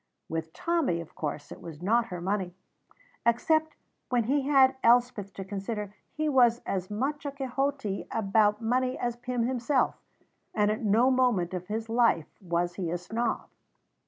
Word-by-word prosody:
With 160 0 -4
Tommy, 320 - 0
of 165 - -9
course, 145 -1 -5
it - - -9
was 160 -3 -9
not 230 +4 +3
her 180 -4 -5
money. 185 0 -2 0.7
Except 315 +7 +2 0.3
when 245 -2 +2
he 270 +4 0
had 265 -2 +5
Elspeth 235 -4 +3
to 195 - -6
consider, 205 +1 -4 0.2
he 310 0 0
was 245 -5 +4
as 185 -1 -2
much 270 +8 -2
a 285 - -3
Quixote 270 -5 -2
about 210 +1 +2
money 255 +2 +1
as 240 -1 -2
Pym 245 0 -2
himself; 255 +2 +1 0.6
and 210 -1 +3
at 215 - -3
no 225 +5 +4
moment 240 -9 +2
of 180 -1 -4
his 220 +1 -3
life 225 -9 +1
was 175 -1 -1
he 180 -4 -2
a 175 - -1
snob. 225 +7 -2
225 Hz, 160 wpm, -28 LUFS, 195-255 Hz, 0.7 s, had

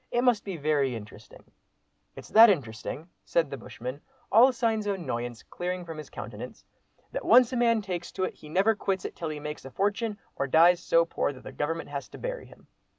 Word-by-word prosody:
It 240 0 +1
must 245 -4 +3
be 195 -4 -5
very 145 -4 +1
interesting." 105 0 -11 0.7
"It's - - -11
that 225 +2 +9
interesting," 140 - -2 0.2
said 165 -4 0
the 140 - -4
bushman, 125 +3 -7 0.3
all 250 +4 +7
signs 225 -4 0
of 200 - +1
annoyance 120 -8 -4
clearing 180 0 -4
from 165 -2 -7
his 155 - -9
countenance, - - -8 0.5
"that - - -4
once 250 0 +6
a - - 0
man 230 -3 +3
takes 180 -3 -4
to 185 - -2
it - - -1
he 150 - -14
never 195 +7 +3
quits 195 -3 -2
it - - -5
till 165 - -4
he 150 -1 -5
makes 150 0 -6
a 135 - -8
fortune 205 - -1 0.2
or 140 - -1
dies 170 +5 +6
so 165 0 +3
poor 165 - -1
that 130 - -14
the - - -8
Government 165 +2 -3
has 140 -1 -5
to - - -11
bury - - -5
him. - - -18
170 Hz, 215 wpm, -28 LUFS, 145-215 Hz, 0.7 s, that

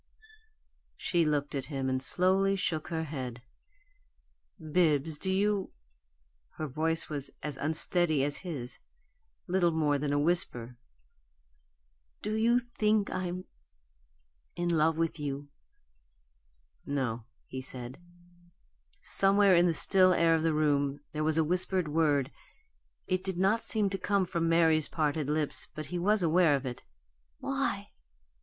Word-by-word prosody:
She 170 -2 +1
looked 145 -1 -1
at 135 -2 -2
him, 135 -3 -3
and 130 0 0
slowly 190 +6 +3
shook 165 -5 -2
her 160 -1 -2
head. 130 -6 -6 1.2
"Bibbs, 155 -2 +1
do 190 - -2
you 200 0 0 0.4
" - - -38
Her 155 - -3
voice 160 +3 -1
was 145 -3 -4
as 150 -2 -4
unsteady 160 0 +1
as 145 +1 -1
his 140 -9 -6 0.7
little 180 -1 +2
more 150 -3 +1
than 145 0 -2
a 145 - +1
whisper. 145 -7 -1 1.5
"Do 210 - -2
you 230 +2 +3
think 215 -4 0
I'm 185 0 -3 1.1
in 175 0 -1
love 160 +1 +2
with 165 -1 -1
you?" 145 0 -4 1.3
"No," 125 -5 -2 0.2
he 130 - -6
said. 130 0 -8 1.0
Somewhere 195 -1 +4
in 175 +1 +5
the - - +3
still 185 +3 +5
air 165 -1 +3
of 160 - +2
the 165 0 +2
room 145 -2 +1
there 155 0 -2
was 155 0 +1
a 160 - +4
whispered 180 +1 0
word; 150 -3 +1 0.7
it 185 0 -1
did 190 -2 -4
not 195 +5 +2
seem 215 -3 0
to 195 - -3
come 200 0 +1
from 170 -2 -1
Mary's 160 -2 +3
parted 150 -2 -1
lips, 150 -1 0
but 155 - -5
he 175 - -1
was 205 +2 +2
aware 165 -2 +4
of 135 0 -4
it. 125 -1 -5 0.6
"Why?" - - -2
160 Hz, 140 wpm, -30 LUFS, 145-185 Hz, 1.5 s, in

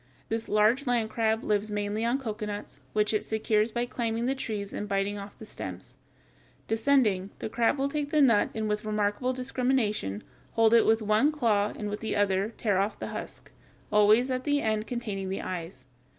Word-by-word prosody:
This 225 0 -2
large 220 +6 +3
land 235 -3 +1
crab 225 -1 +1
lives 210 0 0
mainly 205 +1 -2
on 235 +3 +2
cocoanuts, 210 -5 -5
which 210 0 +1
it 215 - +1
secures 220 0 +1
by 240 +2 -1
climbing 235 -1 -2
the 265 - +1
trees 215 -7 -4
and 210 - -4
biting 200 0 0
off 200 0 -10
the 220 - -10
stems. 95 - -8 0.7
Descending, 220 -5 +2
the - - -5
crab 230 +5 +2
will 275 +1 +1
take 290 0 -2
the 305 - +2
nut 235 -7 +5
and 220 -1 -1
with 210 0 -1
remarkable 210 +3 0
discrimination 250 - -1 0.3
hold 225 0 +4
it 230 - +6
with 225 0 +3
one 215 +8 +3
claw 215 -8 +1
and 210 - -4
with 205 0 -4
the 220 - -3
other 200 0 +1
tear 205 -4 +1
off 200 +2 0
the - - -5
husk, - - -8 0.4
always 215 +5 +5
at 255 0 -1
the 290 +1 +2
end 215 -3 -1
containing 210 -6 -4
the 190 - -3
"eyes." 165 -7 -6
215 Hz, 190 wpm, -28 LUFS, 205-240 Hz, 0.7 s, it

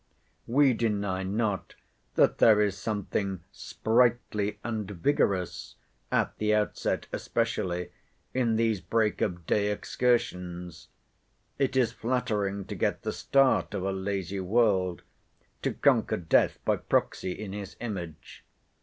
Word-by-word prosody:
We 135 +2 +4
deny 100 -4 -1
not 100 +1 -2 0.4
that - - +3
there 110 -2 +7
is 105 -2 +2
something 100 -3 -3
sprightly 110 -3 +1
and 110 -4 -3
vigorous, 95 -2 0 0.4
at - - +1
the 105 0 +2
outset 105 -1 -1
especially, 95 -7 -1 0.4
in 120 -3 +1
these 110 -4 +1
break 110 -1 0
of 85 -2 -1
day 105 +3 +1
excursions. 90 -7 -1 0.7
It 135 -1 +1
is 120 -3 +3
flattering 105 -6 -1
to - - -6
get - - -1
the - - -2
start 130 -8 +2
of 95 - -2
a 95 - 0
lazy 95 0 -3
world; 95 -3 +1 0.6
to - - 0
conquer - - +2
death 85 -2 +2
by - - +2
proxy 90 - 0
in 100 0 -7
his 100 -2 -7
image. 90 -9 -7
105 Hz, 125 wpm, -28 LUFS, 95-115 Hz, 0.7 s, there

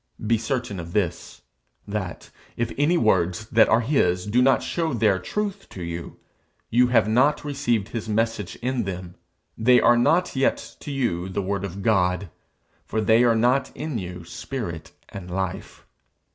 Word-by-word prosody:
Be 115 +1 +2
certain 115 -4 -3
of 85 0 -8
this, 90 -6 -2 0.4
that, 100 -3 -5 0.3
if 120 0 -1
any 155 +5 +2
words 95 - +1
that 115 - +5
are 115 - +4
his 90 -9 +1
do 115 +5 +2
not 135 +1 +4
show 165 -6 -1
their 105 -4 +2
truth 205 - -4
to 90 - -8
you, 85 0 -6 0.5
you 125 +2 +5
have 115 -4 +3
not 130 +8 +2
received 120 -7 -1
his 115 -2 -5
message 110 -3 -1
in 125 -3 -1
them; 90 -2 -6 0.4
they 125 +2 +5
are 120 - +5
not 170 +8 +2
yet 130 0 0
to - - -8
you 115 -10 -1
the 95 +1 -2
word 100 +1 -2
of 100 0 -6
God, 90 -4 +1 0.5
for 110 - -3
they 110 +2 +4
are 120 -2 +4
not 125 +4 +2
in 150 -6 -3
you 90 -2 -7
spirit 90 - -6 0.2
and 90 -2 -8
life. 95 0 -4
110 Hz, 165 wpm, -24 LUFS, 95-125 Hz, 0.5 s, that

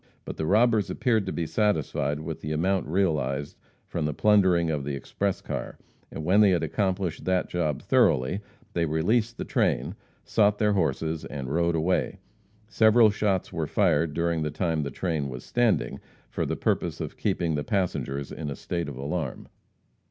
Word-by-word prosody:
But - - -6
the 80 - -2
robbers 110 +1 +3
appeared 110 -5 +1
to - - -1
be 85 - -2
satisfied 80 -5 0
with 80 0 -6
the 75 - -3
amount 95 +4 0
realized 75 -6 0 0.3
from 80 - -2
the 75 -1 -2
plundering 95 -6 +4
of 75 -3 -2
the 70 0 -3
express 95 +8 -2
car, - - -5 0.3
and 80 - -6
when 95 +5 +5
they 105 - +6
had 90 -3 +2
accomplished 95 -4 -1
that 95 -1 +1
job 80 -6 -1
thoroughly, 65 +11 +2 0.3
they 85 -1 +1
released 110 +10 +1
the - - -4
train, - - 0 0.3
sought 105 -1 +2
their 105 -1 +2
horses 80 -3 -1
and 70 -1 -5
rode 85 0 +2
away. 90 +4 0 0.5
Several 110 0 +5
shots 100 -3 -1
were 80 -3 -2
fired 75 +1 +2
during 85 -1 0
the 75 - -1
time 80 -1 -1
the 70 - -3
train 75 -1 -2
was 60 -2 -8
standing, 115 - +1 0.3
for - - -2
the - - -1
purpose - - -1
of - - -5
keeping 85 -2 -1
the 75 -1 -1
passengers 70 -8 -2
in 75 -2 -5
a 70 - -4
state 85 -4 -3
of 70 - -8
alarm. 70 +1 -4
85 Hz, 175 wpm, -26 LUFS, 75-100 Hz, 0.5 s, they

